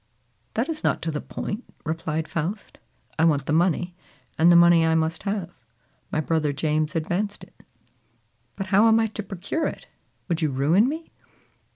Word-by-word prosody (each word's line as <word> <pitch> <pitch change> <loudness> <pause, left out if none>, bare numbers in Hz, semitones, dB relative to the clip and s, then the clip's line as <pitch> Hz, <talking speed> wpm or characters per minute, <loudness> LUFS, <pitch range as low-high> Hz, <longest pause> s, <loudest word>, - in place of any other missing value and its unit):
"That 230 +5 0
is 320 -2 -4
not - - +1
to 165 - -1
the 150 - -3
point," 215 +4 -5 0.2
replied 160 0 -2
Faust. 180 +6 -4 0.4
"I - - +4
want 145 -4 +2
the 145 - -1
money, 175 +1 +1 0.4
and 170 +2 +5
the - - +6
money 170 -1 +7
I 160 0 +3
must 160 0 0
have. 195 -4 -3 0.6
My - - 0
brother 155 -1 0
James 155 +2 -1
advanced 185 +6 -2
it." - - -17 0.9
"But 195 - -4
how 210 +4 +6
am 225 0 +5
I 225 - +3
to 220 -1 -5
procure 200 - -3
it? - - -7 0.4
Would 170 -2 -1
you 155 - +2
ruin 155 - +3
me?" 320 +3 -6
170 Hz, 175 wpm, -24 LUFS, 160-205 Hz, 0.9 s, money